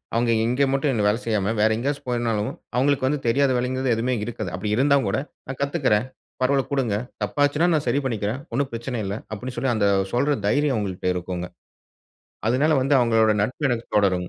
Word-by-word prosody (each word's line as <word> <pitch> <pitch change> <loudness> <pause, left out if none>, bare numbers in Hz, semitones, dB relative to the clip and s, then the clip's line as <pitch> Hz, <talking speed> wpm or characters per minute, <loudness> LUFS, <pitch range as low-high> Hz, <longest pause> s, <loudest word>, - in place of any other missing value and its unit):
அவுங்க 115 0 +2
இங்கே 125 +4 +2
மட்டும் 135 +1 +1
என்ன 110 - 0
வேலை 105 +3 +2
செய்யாம, 110 -2 0
வேற 110 - +5
எங்கயாச்சும் 140 +3 -3
போயிருந்தாலும் 115 -4 -1 0.2
அவுங்களுக்கு 135 +1 +2
வந்து 150 +2 0
தெரியாத 135 +3 +3
வேலைங்கிறது 130 0 0
எதுவுமே 120 +3 0
இருக்காது. 110 -5 -4
அப்பிடி 105 +3 -1
இருந்தாங்கூட 135 -6 +3 0.3
நான் 130 0 -6
கத்துக்கிறேன். 140 -7 +1 0.4
பரவால்ல 135 +1 +3
குடுங்க. 130 -7 0 0.3
தப்பா 105 +7 -2
ஆச்சுன்னா 150 +4 +1
நான் 155 -2 0
சரி 140 - +2
பண்ணிக்கிறேன். 110 0 -2
ஒன்னும் 135 +2 0
பிரச்சனை 120 +2 -4
இல்ல 100 +1 -3 0.2
அப்பிடின்னு 125 +4 -6
சொல்லி 125 0 +1
அந்த 100 -2 +2 0.3
சொல்ற 140 +4 +2
தைரியம் 145 +4 +2
அவுங்கள்ட்ட 95 -3 -2
இருக்குங்க. 90 0 -4 1.0
அதனால 145 +6 +3
வந்து 135 +2 +2
அவுங்களோட 115 -2 +3
நட்பு 130 +6 -1
எனக்கு 120 -1 -2
தொடருங்க. 95 -3 +2
120 Hz, 175 wpm, -23 LUFS, 105-135 Hz, 1.0 s, வேற